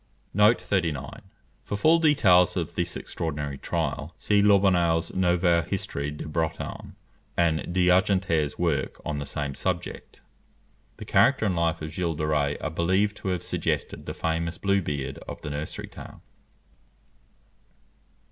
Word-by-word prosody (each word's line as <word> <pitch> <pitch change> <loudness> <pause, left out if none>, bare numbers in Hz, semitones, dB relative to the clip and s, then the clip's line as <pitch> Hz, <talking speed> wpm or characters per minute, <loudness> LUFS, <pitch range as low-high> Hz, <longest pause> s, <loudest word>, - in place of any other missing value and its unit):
For 100 - -3
full 160 +10 +5
details 95 - +4
of 85 -3 -2
this - - -2
extraordinary 75 -4 -4
trial, 75 +3 -3
see 105 -1 +2
Lobineau's 95 -5 +3
Nouvelle 90 -2 +3
Histoire 70 -2 -3
de 75 0 -7
Bretagne, 80 0 -3 0.4
and 80 -2 +3
D'Argentré's 90 -3 +2
work 80 -6 -1
on 75 -1 -2
the 70 - -5
same 70 -2 -3
subject. - - -4 0.8
The - - -8
character - - +3
and 95 -3 +1
life 85 -1 0
of 80 - -5
Gilles 85 -1 -2
de 75 0 -2
Rays 75 -2 +1
are 80 - -3
believed 95 +5 +1
to - - -7
have 90 -3 -1
suggested - - -2
the - - -4
famous 80 +1 -2
Blue 100 0 +1
Beard 70 -5 -4
of - - -7
the 75 - -4
nursery 75 +2 -5
tale. - - -12
85 Hz, 135 wpm, -26 LUFS, 75-95 Hz, 0.8 s, full